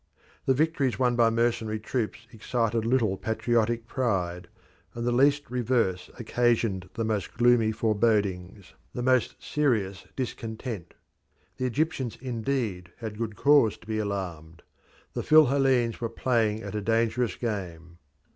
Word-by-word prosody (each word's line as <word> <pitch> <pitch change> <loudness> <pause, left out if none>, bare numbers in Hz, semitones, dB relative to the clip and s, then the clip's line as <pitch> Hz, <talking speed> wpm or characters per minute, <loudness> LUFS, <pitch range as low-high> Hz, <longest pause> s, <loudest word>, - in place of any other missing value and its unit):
The 130 - +4
victories 145 -3 +1
won 125 -2 +2
by 115 -1 +4
mercenary 115 -1 0
troops 110 -2 -3
excited 115 0 -1
little 115 -6 +2
patriotic 115 +1 0
pride, 90 -10 -1 0.5
and 115 0 -3
the 120 - +2
least 140 +3 +3
reverse 115 -7 0
occasioned 115 -5 0
the 115 - -1
most 110 -2 -2
gloomy 120 -2 +4
forebodings, 100 -4 0 0.2
the 125 - -2
most 130 -1 +2
serious 105 -11 0
discontent. 110 -6 -5 0.6
The 130 - -2
Egyptians 130 -2 -1
indeed 115 -7 -3
had 110 -2 -7
good 110 -2 -3
cause 140 -7 +4
to - - -19
be 110 0 -2
alarmed 90 -6 -5 0.5
the - - -2
Phil 155 0 +6
Hellenes 130 -4 +2
were 115 - -1
playing 115 -2 0
at - - -6
a 105 - -2
dangerous 115 0 +1
game. 85 -7 -5
115 Hz, 135 wpm, -27 LUFS, 105-125 Hz, 0.6 s, Phil